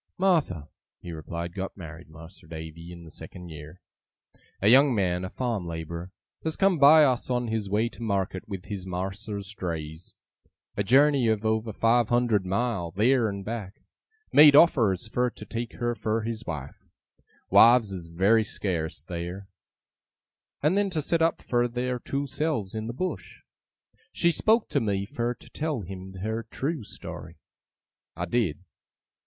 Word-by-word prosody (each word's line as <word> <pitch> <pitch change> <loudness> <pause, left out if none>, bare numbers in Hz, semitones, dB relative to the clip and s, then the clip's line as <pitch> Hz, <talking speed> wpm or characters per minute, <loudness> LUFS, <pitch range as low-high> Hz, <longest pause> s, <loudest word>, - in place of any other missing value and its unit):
'Martha,' 160 - +1 0.3
he 85 - -8
replied, 85 +2 -5
'got 95 +1 -5
married, 80 -2 -10
Mas'r 80 +2 -14
Davy, 80 +1 -8
in 85 -1 -10
the 80 - -12
second 90 +2 -10
year. 75 +3 -11 0.8
A 100 - +1
young 130 +3 +6
man, 90 -3 0
a 95 - -4
farm 115 -6 -2
labourer, 85 +2 -6 0.3
as 160 -1 -1
come 195 -4 +2
by 150 +2 +8
us 130 -4 +1
on 120 -2 0
his 110 -3 -2
way 105 +3 +2
to 120 - -14
market 100 -3 -2
with 95 -2 -6
his 95 -3 -6
mas'r's 100 +3 -4
drays 80 -3 -6 0.6
a 100 - 0
journey 135 +2 +4
of 110 -1 0
over 110 0 0
five 115 +2 +2
hundred 120 -6 +2
mile, 100 -3 -1
theer 115 +5 +2
and 100 -1 -6
back 105 -4 -6 0.5
made 145 -1 +9
offers 115 - +5
fur 125 +3 0
to - - -11
take 115 0 -5
her 120 0 -1
fur 110 -1 -1
his 115 0 -5
wife 75 -5 -6 0.7
(wives 115 -2 +7
is 90 -3 -6
very 95 +7 +3
scarce 80 -9 -3
theer), 90 +3 -6 1.1
and 155 +5 +3
then 200 0 +2
to 170 -4 -2
set 165 +3 0
up 165 0 +1
fur 120 0 +1
their 125 +1 -2
two 140 +3 -3
selves 140 -8 -2
in 110 0 -4
the - - -3
Bush. 185 +9 -5 0.7
She 170 - +2
spoke 220 +7 +2
to - - +1
me 100 -3 -1
fur 120 +4 -2
to - - -17
tell 155 -6 -2
him 95 0 -8
her 110 +1 -2
trew 145 +1 -3
story. - - -9 0.8
I 85 - -3
did. 90 -4 -1
105 Hz, 160 wpm, -27 LUFS, 90-125 Hz, 1.1 s, made